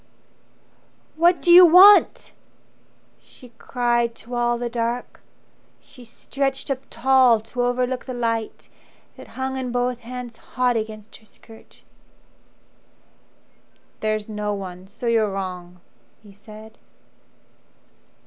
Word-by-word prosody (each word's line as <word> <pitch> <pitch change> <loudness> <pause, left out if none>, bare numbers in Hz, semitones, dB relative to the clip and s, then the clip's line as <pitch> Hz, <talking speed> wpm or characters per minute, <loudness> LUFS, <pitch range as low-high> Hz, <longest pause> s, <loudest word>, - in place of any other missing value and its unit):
"What 345 +2 +2
do 350 - +3
you 360 +1 +10
want?" 370 +4 +6 0.9
she 250 - -18
cried 240 -2 -1
to 235 +2 -11
all 240 0 0
the 240 0 -4
dark. 235 +1 -4 0.6
She 250 -3 -17
stretched 270 +4 -4
up 265 - -2
tall 255 -1 +3
to 225 +3 -6
overlook 250 +1 -2
the 255 -1 -7
light 230 -2 -4 0.5
That - - -13
hung 265 0 -3
in 255 -2 -4
both 245 0 -2
hands 245 -1 -9
hot 250 -1 -2
against 215 -1 -6
her 220 - -24
skirt. 225 +2 -19 2.2
"There's 215 -1 -3
no 210 -1 -4
one; 185 -1 -9
so 215 +4 -11
you're 225 -3 +1
wrong," 180 -2 -7 0.4
he 205 - -16
said. 215 +2 -15
240 Hz, 115 wpm, -21 LUFS, 215-255 Hz, 2.2 s, you